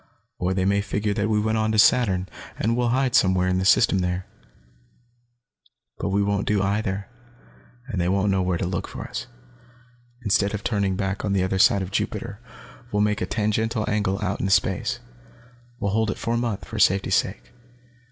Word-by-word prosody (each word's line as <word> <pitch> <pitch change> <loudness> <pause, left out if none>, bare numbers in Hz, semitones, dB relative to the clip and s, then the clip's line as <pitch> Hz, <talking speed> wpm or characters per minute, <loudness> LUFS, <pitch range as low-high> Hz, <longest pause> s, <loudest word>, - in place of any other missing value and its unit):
Or 90 +1 0
they 95 -1 +1
may 100 +1 +2
figure 100 +1 -1
that 105 +2 -1
we 105 -1 +2
went 110 +1 0
on 110 0 +1
to - - +1
Saturn, 105 -5 +4 0.3
and 115 +2 0
will 120 0 +1
hide 130 0 +1
somewhere 95 -1 +3
in 90 0 +1
the 95 - -1
system 100 -1 +4
there. 90 0 -2 1.7
"But - - -2
we 100 +1 +1
won't 100 0 -1
do 105 -2 +2
either, 100 -1 -1 0.8
and 100 -9 -3
they 85 - +1
won't 100 +1 +2
know 95 -1 +1
where 90 -1 0
to 90 - -2
look 90 0 -3
for - - -7
us. - - -6 1.0
Instead 100 0 +2
of 105 - -6
turning 100 -4 0
back 95 +1 -2
on 100 - 0
the 95 -2 +2
other 95 +1 -1
side 100 0 +5
of 95 - -7
Jupiter, 100 +1 -3 0.5
we'll 105 0 +2
make 105 -1 0
a 90 - -1
tangential 110 +1 -1
angle 100 -2 0
out 100 - -2
into 95 - -1
space. 100 +6 +1 0.8
We'll 100 -1 -1
hold 110 +1 +1
it - - -3
for 115 - -2
a - - +1
month, 115 -4 -2
for 110 - -6
safety's 95 0 +3
sake. - - -1
100 Hz, 195 wpm, -24 LUFS, 95-110 Hz, 1.7 s, side